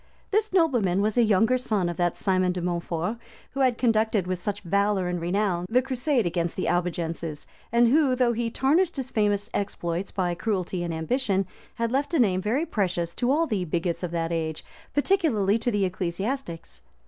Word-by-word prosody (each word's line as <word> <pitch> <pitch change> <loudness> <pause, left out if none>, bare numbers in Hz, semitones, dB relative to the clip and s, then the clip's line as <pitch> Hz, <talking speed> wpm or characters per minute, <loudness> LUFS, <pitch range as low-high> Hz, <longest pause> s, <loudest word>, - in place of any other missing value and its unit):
This 430 +1 +1
nobleman 245 - +2
was 215 0 +1
a 245 - +5
younger 225 +3 +3
son 210 -7 0
of 175 - -3
that 175 -1 0
Simon 185 -2 +2
de 180 - -3
Mountfort 175 +3 -2 0.3
who 275 - -6
had 255 -3 +3
conducted 220 -4 +2
with 185 -1 -2
such 205 +2 -3
valor 200 0 +1
and 175 -1 -2
renown 180 0 0
the 250 +3 +3
crusade 260 -1 0
against 170 0 -1
the 185 - -2
Albigenses, 170 -3 -2 0.3
and 235 +1 +5
who, 280 -1 +4
though 245 -2 +2
he 235 0 -1
tarnished 320 +9 +2
his 260 -2 -4
famous 205 -1 +1
exploits 175 -2 -2
by 180 -3 -1
cruelty 185 -1 -2
and 170 -1 -2
ambition, 195 +4 0 0.3
had 230 0 -1
left 285 +5 0
a - - +3
name 190 -6 +3
very 245 - 0
precious 175 - -1
to 245 - -1
all 310 +5 +3
the 210 - -1
bigots 170 0 -2
of 180 - -2
that 165 0 -2
age, 160 -2 -2 0.3
particularly 280 - +2
to 230 - 0
the 205 -4 +1
ecclesiastics. 185 +2 -4
200 Hz, 185 wpm, -26 LUFS, 175-245 Hz, 0.3 s, a